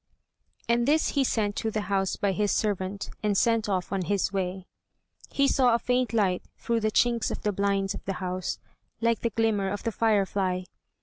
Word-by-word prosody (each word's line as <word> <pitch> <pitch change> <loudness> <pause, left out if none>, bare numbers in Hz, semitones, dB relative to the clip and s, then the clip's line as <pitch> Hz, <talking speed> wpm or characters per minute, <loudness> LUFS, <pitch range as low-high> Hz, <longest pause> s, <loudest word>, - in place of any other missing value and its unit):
And 235 +1 +2
this 310 +2 +3
he 280 - +2
sent 210 -5 0
to 220 - -1
the 215 -1 -2
house 195 -2 0
by 200 - 0
his 205 +1 0
servant, 200 -1 -1
and 210 -2 +1
set 230 -1 +2
off 185 -2 -1
on 195 -2 -1
his 200 0 0
way. 185 -1 -2 0.6
He 275 0 +2
saw 250 -4 +4
a - - +3
faint 250 +1 0
light 195 -6 +1 0.2
through 235 -1 0
the 215 -1 +1
chinks 235 +1 +2
of - - -5
the 210 - +1
blinds 200 0 0
of - - -8
the 195 - -1
house, 185 0 -3 0.4
like 230 -1 +1
the 235 - 0
glimmer 215 -3 +1
of 205 +1 -4
the 230 - -1
firefly. 195 -4 +1
205 Hz, 195 wpm, -27 LUFS, 195-230 Hz, 0.6 s, saw